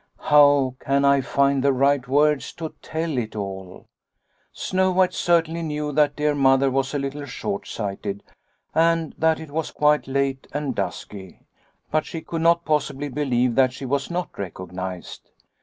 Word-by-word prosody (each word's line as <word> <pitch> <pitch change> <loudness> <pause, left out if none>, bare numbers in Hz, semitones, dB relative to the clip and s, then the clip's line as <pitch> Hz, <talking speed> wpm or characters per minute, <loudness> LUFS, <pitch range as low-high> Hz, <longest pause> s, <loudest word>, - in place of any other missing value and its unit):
How 145 -3 +5
can 140 +1 +1
I 140 0 +4
find 140 +2 +1
the 140 - +4
right 135 0 +2
words 145 0 +2
to 160 -2 -6
tell 160 -4 -2
it 110 -2 -5
all? 95 -2 -6 0.7
Snow 185 0 0
White 185 0 +2
certainly 170 -1 +1
knew 150 -2 -3
that 145 0 +2
dear 150 0 +1
Mother 135 -1 +3
was 135 +2 -1
a - - +2
little 140 +1 -4
short 105 -6 -4
sighted 100 -1 -4 0.5
and 165 0 +2
that 160 0 +2
it 160 -2 -10
was 160 +1 -2
quite 150 0 +2
late 135 0 -1
and 145 -2 -2
dusky, 95 -5 -6 0.5
but 155 0 0
she 165 - -6
could 165 0 -4
not 170 +1 +3
possibly 145 -2 -1
believe 125 -3 0
that 130 0 +3
she 135 - -7
was 140 +1 -1
not 175 -1 -4
recognised. 95 -1 -7
140 Hz, 160 wpm, -23 LUFS, 130-155 Hz, 0.7 s, How